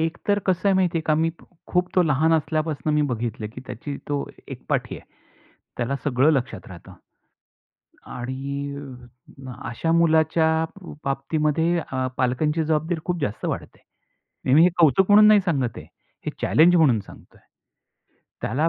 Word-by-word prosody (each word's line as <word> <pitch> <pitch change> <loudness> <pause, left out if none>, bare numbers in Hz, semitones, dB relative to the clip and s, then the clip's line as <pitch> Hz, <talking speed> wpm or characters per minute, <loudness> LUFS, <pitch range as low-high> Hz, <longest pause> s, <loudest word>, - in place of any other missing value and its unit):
एक 165 +1 -1
तर 205 0 +3
कसं 185 +1 +1
आहे 195 - +3
माहिती 180 -3 +1
आहे - - -4
का? 155 - +3
मी 160 +1 +1 0.4
खूप 180 0 +1
तो 185 - +5
लहान 160 0 +2
असल्यापासून 155 -2 -1
मी 150 - +3
बघितलं, 115 -2 -4
की 125 - -8
त्याची 145 -1 -6
तो 145 -1 -2 0.2
एकपाठी - - -3
आहे. - - -20 0.7
त्याला 125 +3 -1
सगळं 140 +2 +3
लक्षात 130 -4 -2
राहतं. 90 -2 -12 1.1
आणि 140 +3 -5 0.7
अ, - - -6 0.2
अशा 165 +8 -2
मुलाच्या 160 -1 +3 0.3
ब 175 - -9
बाबतीमध्ये 155 +4 0
अ, 130 0 -1
पालकांची 150 +5 0
जबाबदारी 160 +2 -1
खूप 180 -2 -2
जास्त 105 -7 -3
वाढते. - - -5 0.8
मी 160 - +7
हे 180 - +7
कौतुक 185 +6 +4
म्हणून 210 +1 +8
नाही 210 -1 +6
सांगत 135 -9 -1
आहे. - - -10 0.4
हे - - 0
चॅलेंज 170 +3 +5
म्हणून 135 -10 +4
सांगतोय. - - -16 1.0
त्याला 150 +9 0
155 Hz, 150 wpm, -23 LUFS, 135-165 Hz, 1.1 s, म्हणून